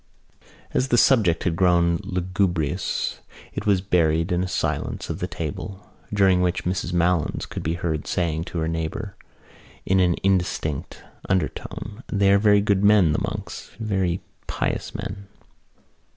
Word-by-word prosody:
As 130 - +1
the 120 - +3
subject 105 -11 +4
had 85 -3 0
grown 85 -1 +3
lugubrious 90 -3 -1 0.3
it - - -4
was 100 -3 +4
buried 85 -2 +2
in 90 0 +1
a - - -2
silence 90 - -2
of - - -5
the - - -2
table 95 0 -6 0.2
during 95 -3 +4
which 90 -1 0
Mrs 90 0 -1
Malins 85 -1 +1
could - - -6
be 80 +2 -1
heard 80 -3 -3
saying 80 -2 -1
to 90 - -6
her 80 -1 0
neighbour 80 +5 -3 0.7
in 95 0 +3
an 90 -2 +3
indistinct 90 -6 -1 0.3
undertone: 100 +3 -2
"They 100 -1 +3
are 100 - +5
very 105 -1 +5
good 100 -1 +1
men, 100 -6 +6
the 75 - 0
monks, - - -5
very 95 -5 0 0.3
pious - - -2
men." 100 0 -6
90 Hz, 150 wpm, -24 LUFS, 85-100 Hz, 0.7 s, men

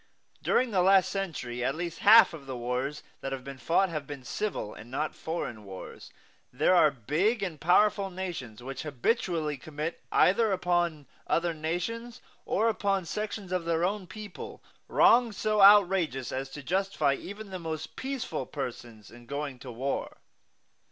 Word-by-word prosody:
During 255 -2 +2
the 190 -3 +3
last 190 0 +5
century 130 -11 -3
at 135 +3 0
least 170 0 -4
half 220 -3 +8
of 145 -4 -10
the 130 -2 -4
wars 125 +5 -3 0.2
that 135 - -5
have 135 -1 -4
been 135 0 -8
fought 170 +9 +2
have 155 -4 -4
been 140 -3 -7
civil 125 - -3
and 115 - -12
not 150 +5 -2
foreign 140 -10 -5
wars. 95 -2 -10 0.4
There 145 +8 +3
are 160 -3 +6
big 160 - 0
and 165 -6 -4
powerful 195 +3 +3
nations 170 - -6
which 135 +1 -5
habitually 155 - -1
commit, 155 +4 -5
either 215 +3 +4
upon 175 -5 0 0.2
other 170 0 +1
nations 230 +10 -4 0.3
or 220 +3 +1
upon 200 -4 0
sections 205 +1 -4
of 180 -2 0
their 165 0 +1
own 195 0 -2
people, 210 +1 -9 0.2
wrongs 235 -3 +4
so 215 -1 +1
outrageous 190 -10 +5
as 135 +1 -3
to 145 +1 -9
justify 185 -4 +1
even 200 +7 -8
the 185 - -5
most 160 -2 -5
peaceful 265 -1 -4
persons 120 -6 -7
in 120 0 -14
going 140 -1 -4
to 125 - -8
war. 130 +4 -3
165 Hz, 160 wpm, -29 LUFS, 135-195 Hz, 0.4 s, half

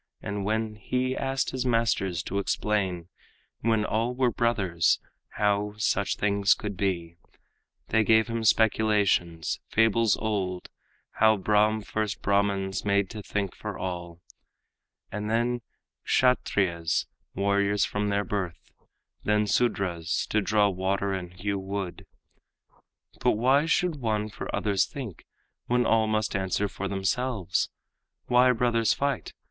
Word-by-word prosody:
And 100 -1 -4
when 110 +1 -1
he 130 +4 -1
asked 135 0 -1
his 130 -1 -2
masters 115 -7 +1
to 100 - -2
explain, 95 -4 -1 0.5
When 110 -1 +1
all 115 +4 -1
were 125 -1 +2
brothers, 95 -8 +1 0.4
how 105 0 +1
such 100 -1 +1
things 100 +1 +3
could 105 -2 -5
be, 85 -3 -2 0.7
They 110 - +3
gave 110 0 +4
him 115 -1 -3
speculations, 105 -7 +2
fables 115 -1 +3
old, 95 -5 -2 0.5
How 110 0 +5
Brahm 105 +2 +2
first 110 0 -3
Brahmans 100 -1 +1
made 100 -1 +1
to 110 -2 -6
think 100 -2 -3
for - - -6
all, 85 -2 -5 0.9
And 105 +1 -4
then 120 +2 +1 0.4
Kshatriyas, 95 -9 +1 0.3
warriors 100 +1 +2
from 105 0 -2
their 100 0 0
birth, 90 -3 -4 0.5
Then 105 0 +2
Sudras, 95 -7 0
to 110 - +2
draw 105 0 +3
water 95 +1 -1
and 90 -2 -5
hew 100 +3 -3
wood. 95 -1 -5 1.1
"But - - +3
why 130 +7 +3
should 170 -1 +1
one 110 -4 -1
for - - -7
others 100 -3 +1
think, 125 - -8 0.4
when 125 0 +2
all 110 -1 +3
Must 110 -1 0
answer 95 +1 0
for 100 0 -5
themselves? 100 -1 -1 0.6
Why 125 +1 +5
brothers 115 -2 +2
fight? 140 0 -2
105 Hz, 130 wpm, -27 LUFS, 95-115 Hz, 1.1 s, How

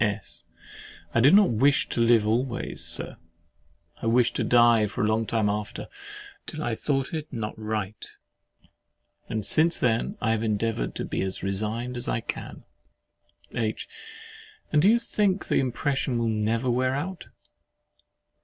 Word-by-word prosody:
S. 105 -1 -3 0.7
I - - +3
did 140 +10 +6
not 205 -7 +6
wish 135 +5 +3
to 120 - -1
live 115 -2 +4
always, 120 +3 -1
Sir—I 85 +5 -8
wished 120 +1 +3
to - - 0
die 120 -3 +5
for 100 - -3
a - - +2
long 110 0 0
time 110 -2 +1
after, 105 0 -3 0.6
till 155 -1 -5
I 120 - -1
thought 135 +4 -2
it 155 -1 -4
not 110 -4 -4
right; 110 -2 -4 1.3
and 110 -2 -2
since 165 +7 +5
then 125 - 0
I 110 - 0
have 115 -1 0
endeavoured 110 - -1
to - - -3
be - - -3
as 95 -1 -4
resigned 110 +6 -2
as 120 - -4
I - - 0
can. - - -7 0.9
H. 110 -2 -2 0.8
And 150 - +4
do 190 - +5
you 230 - +5
think 205 -4 -1
the - - +3
impression 135 0 -1
will 115 -1 0
never 110 +3 0
wear 130 +2 +1
out? 175 +5 -5
115 Hz, 155 wpm, -26 LUFS, 110-135 Hz, 1.3 s, did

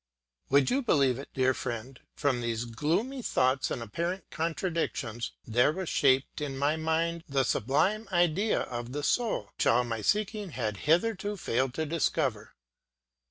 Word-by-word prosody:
Would 140 0 +4
you 270 +3 +2
believe 140 - +2
it, 140 - -8
dear 130 -1 +3
friend, 120 +2 -5 0.2
from 130 -4 0
these 115 0 -2
gloomy 165 - -1
thoughts 130 - +1
and 115 - -3
apparent 170 - -3
contradictions, 160 - -2
there 120 +5 +3
was 185 +1 -4
shaped 135 +1 +2
in 140 -2 -3
my 145 +3 +2
mind 165 +1 0
the 135 -1 +2
sublime 170 - +1
idea 175 +4 +2
of 120 0 -5
the 145 0 -3
soul, 220 - 0
which - - +2
all 125 +2 +4
my 115 -2 -3
seeking 210 - 0
had 110 -5 -2
hitherto 205 +4 +2
failed 130 -5 -1
to 160 - -1
discover? 135 -9 -1
145 Hz, 155 wpm, -29 LUFS, 125-175 Hz, 0.2 s, Would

